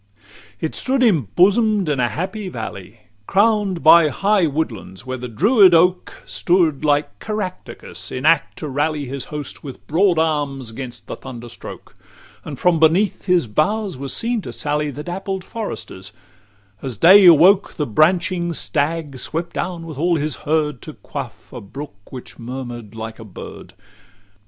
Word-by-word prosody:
LVI 100 +1 -40 0.4
It 160 - -2
stood 260 0 -1
embosom'd 200 - +3
in 145 -3 0
a 120 -1 +2
happy 185 - -4
valley, 110 - -8 0.3
Crown'd 205 -3 +2
by 165 0 +7
high 195 +2 +2
woodlands, 115 - -4
where 130 0 -5
the 125 - -5
Druid 190 - +5
oak 180 +2 +2
Stood 170 -6 +1
like 145 0 0
Caractacus 210 -4 -6
in 130 +3 -4
act 165 -2 +3
to 155 - -5
rally 145 +1 -1
His 135 0 -5
host, 150 -2 -7
with 135 -4 -10
broad 175 +2 +2
arms 145 -6 -1
'gainst 120 -3 -8
the - - -6
thunderstroke; 120 -2 -10 0.5
And - - -7
from 180 -2 +2
beneath 170 +6 +2
his 180 -4 +3
boughs 190 - 0
were 135 +1 -6
seen 230 - -1
to - - -7
sally 150 0 -1
The 145 +2 -7
dappled 190 +2 -4
foresters 200 - -7 0.7
as 130 -5 -5
day 190 - +8
awoke, 180 +5 +6
The 150 - -1
branching 170 - +1
stag 150 -3 -1
swept 165 +5 -3
down 175 -2 -4
with 155 -4 -8
all 170 +2 +2
his 155 -2 -2
herd, 150 -3 0
To 155 - -9
quaff 135 -6 -8
a 125 - -7
brook 100 -1 -10
which 130 0 -10
murmur'd 120 -3 -7
like 110 0 -7
a - - -8
bird. 105 -4 -11
155 Hz, 155 wpm, -20 LUFS, 130-180 Hz, 0.7 s, day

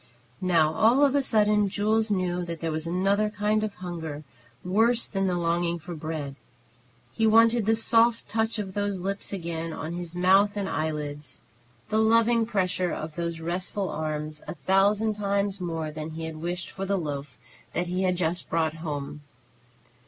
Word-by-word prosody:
Now 165 -4 +3
all 245 - +5
of 275 - +2
a 285 - +3
sudden 210 -4 +3
Jules 215 +3 +1
knew 180 -3 0
that 170 -1 -5
there 165 -1 -2
was 160 +1 -3
another 195 +4 +1
kind 210 +1 0
of 215 -2 -3
hunger 165 -4 -6 0.4
worse 225 +6 +3
than 195 -1 -1
the 180 -1 0
longing 170 0 0
for 175 +2 -8
bread. 155 -3 -5 0.7
He 225 -1 +1
wanted 225 0 +5
the 225 - +4
soft 230 +1 +3
touch 225 +1 -1
of 195 -3 -4
those 205 -1 -1
lips 195 +2 -3
again 165 -3 -4
on 160 +1 -5
his 175 -1 -5
mouth 195 +3 +4
and 200 -1 -1
eyelids, 150 -4 -4 0.5
the 220 - +2
loving 230 +1 +4
pressure 185 -4 0
of 155 0 -5
those 170 -1 -3
restful 185 +3 -2
arms, 155 0 -4
a - - -5
thousand 200 +7 +2
times 200 -1 -1
more 165 -3 -3
than 155 +1 -6
he 160 +1 -6
had 160 -1 -6
wished 175 +3 -4
for 195 - -6
the 200 0 +1
loaf 145 -5 -5 0.4
that 175 - 0
he 180 +1 -2
had 185 -1 +2
just 175 0 -1
brought 160 -1 0
home. 150 -2 -5
180 Hz, 175 wpm, -27 LUFS, 160-210 Hz, 0.7 s, all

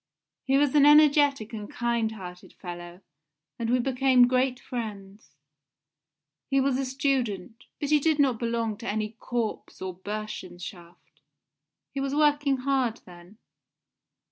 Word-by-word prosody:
He 270 +1 +3
was 285 -1 +2
an 295 -2 +5
energetic 290 -5 +5
and 210 -2 -6
kind 235 -2 -1
hearted 180 -4 -10
fellow, 175 0 -9 0.6
and 230 -1 -2
we 250 - +3
became 255 0 +4
great 255 0 +1
friends. 205 -8 -7 1.1
He 275 0 +3
was 270 -1 +1
a 270 - -1
student, 255 -6 -2
but 290 0 -3
he 300 - +5
did 315 +1 +2
not 265 -6 +2
belong 230 -2 -1
to 235 - -8
any 215 0 -2
Korps 235 -3 -4
or 185 -1 -5
Bursenschaft, 180 -5 -8 0.7
he 275 - -3
was 275 +1 -2
working 290 -2 +3
hard 260 -5 +1
then. 180 +3 -15
235 Hz, 135 wpm, -27 LUFS, 205-275 Hz, 1.1 s, an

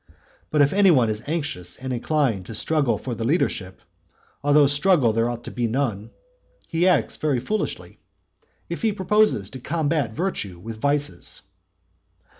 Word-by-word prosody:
But 150 -2 +4
if 140 - +1
any 200 -1 +5
one 125 -9 +4
is 110 +6 -5
anxious 145 - -3
and 130 0 -4
inclined 120 - 0
to 115 - -6
struggle 150 +1 +1
for 125 - -5
the 115 - -4
leadership 110 - -1 0.6
though 145 0 +5
struggle 145 - +3
there 115 +2 +1
ought 120 0 -5
to - - -7
be 120 -1 -1
none 115 -4 -2 0.6
he 170 +2 +1
acts 185 - +2
very 145 -5 0
foolishly, 210 - -3 0.7
if - - -5
he 220 -3 +1
proposes 200 - +2
to 130 - -8
combat 150 -3 -1
virtue 145 - -3
with 110 +5 -9
vices. 145 0 -2
140 Hz, 155 wpm, -23 LUFS, 115-160 Hz, 0.7 s, any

